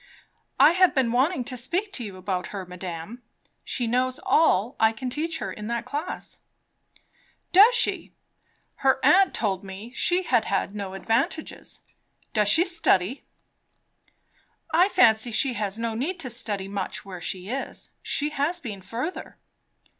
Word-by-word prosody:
"I 305 - +8
have 370 0 +4
been 260 -4 +2
wanting 260 +4 +1
to 255 - -4
speak 350 - -2
to 250 - -5
you 200 -4 -7
about 185 -1 -3
her, 195 -2 -6
madame. 180 +5 -7 0.4
She 245 - -1
knows 255 +4 0
all 260 - +3
I 220 0 +4
can 250 +2 -5
teach 320 +4 -2
her - - -5
in 210 0 -7
that 235 0 -2
class." 300 +5 -5 1.1
"Does 425 +7 +7
she! - - +1 0.7
Her 265 -1 +2
aunt 385 +1 +5
told 195 -4 -1
me 200 +5 -9
she 355 +7 +1
had 240 -9 +2
had 195 0 -1
no 200 -2 -5
advantages. 225 +9 -2 0.5
Does 210 -2 +3
she 330 - +5
study?" 265 - +1 1.5
"I 355 +4 +5
fancy 225 - +4
she 245 +3 +1
has 205 -2 -3
no 230 0 -2
need 310 +11 -3
to 255 - -5
study 205 -5 -3
much 200 0 -4
where 185 -3 -8
she 185 +2 -4
is. 270 +2 -5
She 295 +1 0
has 300 +4 -1
been 210 -7 -7
further." 235 - -5
240 Hz, 155 wpm, -25 LUFS, 200-300 Hz, 1.5 s, I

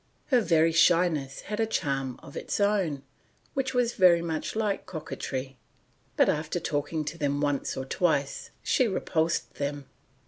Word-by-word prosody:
Her 250 -4 +5
very 165 -5 +3
shyness 165 -4 +3
had 210 +1 -5
a 225 - +2
charm 135 - -2
of - - -12
its - - -3
own, 195 -9 +1 0.5
which 265 -2 -1
was 245 -1 +2
very 175 -3 +5
much 160 +2 -3
like 210 -3 -1
coquetry; 135 -5 -5 0.6
but - - +5
after 155 +3 0
talking 150 0 -2
to 160 +3 -5
them 145 -1 0
once 145 -1 -1
or 130 - -3
twice 140 -3 0
she 255 - +3
repulsed 165 -5 -1
them. 140 0 -3
160 Hz, 150 wpm, -28 LUFS, 145-195 Hz, 0.6 s, Her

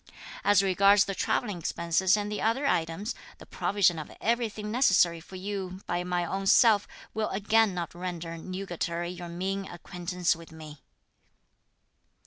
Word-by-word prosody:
As 205 -1 +5
regards 195 +1 +5
the 195 - -3
travelling 205 -1 -1
expenses 170 +4 +1
and 205 0 -3
the 210 - -3
other 230 +6 +1
items, 170 -1 0 0.2
the - - -13
provision 185 -5 +1
of 155 - -7
everything 220 -2 -1
necessary 190 -8 +4
for 175 +3 -13
you 190 -1 -5
by 175 0 -1
my 180 -1 -1
own 195 +3 -3
self 210 -1 +5 0.3
will 220 0 -1
again 210 0 +2
not 170 -2 -4
render 175 -1 -5
nugatory 175 -1 -4
your 175 -1 -8
mean 190 +3 -3
acquaintance 175 0 -2
with 165 0 -13
me." 155 -2 -11
185 Hz, 145 wpm, -28 LUFS, 175-205 Hz, 0.3 s, As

